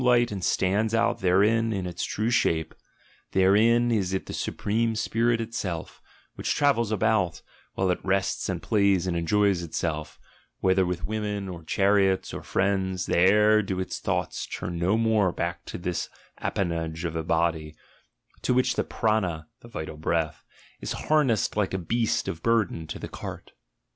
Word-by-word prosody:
ght 120 Hz, -2 st, +4 dB
and 95 Hz, -3 st, -5 dB
stands 105 Hz, +6 st, +1 dB
out 115 Hz, +1 st, +1 dB
therein 110 Hz, +5 st, +3 dB
in 95 Hz, -4 st, -2 dB
its 90 Hz, -1 st, -4 dB
true 110 Hz, +3 st, -1 dB
shape: 80 Hz, -9 st, +1 dB, 0.6 s
therein 110 Hz, +6 st, +4 dB
is 95 Hz, -5 st, 0 dB
it 95 Hz, -, -4 dB
he -, -, -6 dB
supreme 115 Hz, +2 st, -1 dB
spirit 115 Hz, +2 st, +1 dB
itself, 100 Hz, -8 st, -4 dB, 0.3 s
which -, -, -2 dB
travels 135 Hz, -7 st, +2 dB
about, 95 Hz, -5 st, +1 dB, 0.3 s
while 95 Hz, -1 st, +1 dB
it 90 Hz, -, -1 dB
ests 95 Hz, 0 st, 0 dB
and -, -, -3 dB
plays 100 Hz, -4 st, +2 dB
and 90 Hz, -2 st, -1 dB
enjoys 95 Hz, +2 st, +2 dB
itself, 75 Hz, -2 st, -4 dB, 0.4 s
whether 95 Hz, -1 st, +3 dB
with 90 Hz, -1 st, -3 dB
women, 105 Hz, -2 st, -3 dB
or 85 Hz, -3 st, -7 dB
:hariots, 95 Hz, 0 st, +2 dB
or -, -, -5 dB
friends; 95 Hz, -1 st, 0 dB
there 105 Hz, +4 st, +4 dB
do 95 Hz, -2 st, -3 dB
its 95 Hz, -, -3 dB
thoughts -, -, -2 dB
turn 85 Hz, -1 st, -5 dB
no 95 Hz, +5 st, +2 dB
more 110 Hz, -5 st, +2 dB
>ack 85 Hz, 0 st, -2 dB
to -, -, -6 dB
this 90 Hz, -1 st, -3 dB, 0.3 s
appanage 85 Hz, -3 st, -2 dB
of 85 Hz, -1 st, -3 dB
a 80 Hz, -, -1 dB
body, 80 Hz, -1 st, 0 dB, 0.7 s
to 125 Hz, -, +1 dB
which 130 Hz, -, +3 dB
the -, -, 0 dB
'prana' 95 Hz, -8 st, -1 dB
'the -, -, -14 dB
vital 80 Hz, -8 st, -6 dB
breath) 80 Hz, 0 st, -1 dB, 0.4 s
is -, -, -4 dB
harnessed 135 Hz, -9 st, +1 dB
like 100 Hz, -2 st, 0 dB
a -, -, +1 dB
beast 115 Hz, +6 st, 0 dB
of 80 Hz, -, -4 dB
burden 110 Hz, -8 st, +1 dB
:o -, -, -5 dB
the -, -, -6 dB
cart." -, -, -8 dB
95 Hz, 165 wpm, -26 LUFS, 85-110 Hz, 0.7 s, ght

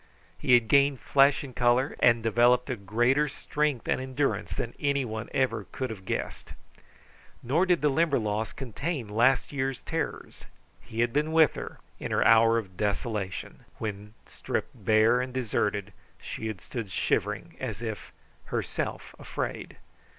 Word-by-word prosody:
He 125 Hz, -, +4 dB
had 120 Hz, -2 st, +3 dB
gained 140 Hz, +2 st, +4 dB
flesh 140 Hz, +2 st, +4 dB
and 130 Hz, -3 st, -9 dB
color, 125 Hz, +3 st, +2 dB
and 115 Hz, -2 st, +4 dB
developed 120 Hz, +3 st, +3 dB
a -, -, -1 dB
greater 120 Hz, +8 st, +2 dB
strength 150 Hz, -2 st, -2 dB
and -, -, +1 dB
endurance 130 Hz, +2 st, -1 dB
than 120 Hz, -, -3 dB
anyone 130 Hz, -6 st, -1 dB
ever 115 Hz, -6 st, 0 dB
could 130 Hz, -3 st, -3 dB
have 95 Hz, -4 st, -9 dB
guessed. -, -, -4 dB, 0.9 s
Nor 155 Hz, +10 st, +2 dB
did 180 Hz, -2 st, +3 dB
the 150 Hz, -, +5 dB
Limberlost 115 Hz, -9 st, 0 dB
contain 135 Hz, +1 st, -4 dB
last 120 Hz, +6 st, +2 dB
year's 135 Hz, -2 st, -2 dB
terrors. -, -, -5 dB, 0.4 s
He 115 Hz, +1 st, -4 dB
had 120 Hz, 0 st, +1 dB
been 150 Hz, +2 st, +1 dB
with 160 Hz, -1 st, +5 dB
her -, -, -7 dB, 0.2 s
in -, -, -4 dB
her -, -, +1 dB
hour 115 Hz, 0 st, +6 dB
of 95 Hz, -5 st, -5 dB
desolation, 105 Hz, -1 st, -3 dB, 0.2 s
when 105 Hz, 0 st, -6 dB
stripped -, -, -4 dB
bare 110 Hz, +3 st, +3 dB
and 130 Hz, 0 st, -4 dB
deserted, 105 Hz, -5 st, -1 dB, 0.3 s
she 110 Hz, -, -5 dB
had 110 Hz, -4 st, -5 dB
stood 115 Hz, -5 st, -6 dB
shivering, -, -, -1 dB
as 115 Hz, -4 st, -5 dB
if 110 Hz, -2 st, -5 dB, 0.3 s
herself -, -, -4 dB
afraid. -, -, -5 dB
120 Hz, 150 wpm, -28 LUFS, 110-135 Hz, 0.9 s, hour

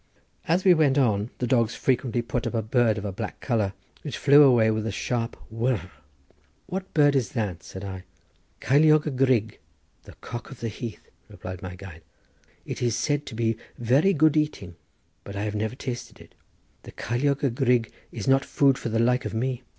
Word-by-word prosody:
As 175 Hz, +3 st, +2 dB
we 185 Hz, -, +8 dB
went 150 Hz, -4 st, +3 dB
on 110 Hz, -5 st, +2 dB
the 125 Hz, -, -1 dB
dogs 115 Hz, -2 st, +1 dB
frequently 120 Hz, -2 st, 0 dB
put 120 Hz, +1 st, -2 dB
up -, -, -4 dB
a 115 Hz, -, 0 dB
bird 110 Hz, -1 st, +2 dB
of 105 Hz, -, -5 dB
a 100 Hz, -, -2 dB
black 105 Hz, +3 st, -6 dB
colour, 110 Hz, -6 st, 0 dB, 0.3 s
which 145 Hz, -, -5 dB
flew 145 Hz, +1 st, +6 dB
away 120 Hz, -6 st, +5 dB
with 110 Hz, 0 st, -2 dB
a -, -, -2 dB
sharp 115 Hz, +2 st, -2 dB, 0.2 s
whirr. 115 Hz, -5 st, -1 dB, 0.7 s
"What 190 Hz, +1 st, -5 dB
bird 145 Hz, -2 st, +5 dB
is 125 Hz, -7 st, 0 dB
that?" 105 Hz, -9 st, -2 dB
said 95 Hz, -, -9 dB
I. 95 Hz, -2 st, -6 dB, 0.6 s
"Ceiliog 155 Hz, +3 st, +4 dB
y 150 Hz, -, -1 dB
grug, 125 Hz, -5 st, +1 dB, 0.5 s
the -, -, -12 dB
cock 120 Hz, -2 st, -8 dB
of 135 Hz, -, -11 dB
the 115 Hz, -, -3 dB
heath," 115 Hz, +1 st, -8 dB, 0.2 s
replied 95 Hz, 0 st, -8 dB
my 90 Hz, -2 st, -7 dB
guide. 90 Hz, -4 st, -11 dB, 0.6 s
"It -, -, -6 dB
is 120 Hz, -2 st, +1 dB
said 145 Hz, +4 st, -1 dB
to -, -, -7 dB
be 115 Hz, -1 st, 0 dB, 0.2 s
very 130 Hz, +11 st, +3 dB
good 155 Hz, -3 st, +3 dB
eating, 150 Hz, -, -1 dB, 0.5 s
but 100 Hz, -, -9 dB
I 100 Hz, -, -3 dB
have 105 Hz, -1 st, -2 dB
never 110 Hz, +3 st, -2 dB
tasted 125 Hz, -2 st, -6 dB
it. -, -, -16 dB, 0.5 s
The -, -, -12 dB
ceiliog 140 Hz, +5 st, -1 dB
y 140 Hz, -, +3 dB
grug 120 Hz, -2 st, +1 dB, 0.2 s
is 110 Hz, -, -6 dB
not 135 Hz, +1 st, +4 dB
food 135 Hz, -2 st, +2 dB
for -, -, -4 dB
the 115 Hz, -, -1 dB
like 125 Hz, +2 st, +2 dB
of -, -, -4 dB
me. 125 Hz, +2 st, -1 dB
120 Hz, 195 wpm, -25 LUFS, 110-135 Hz, 0.7 s, we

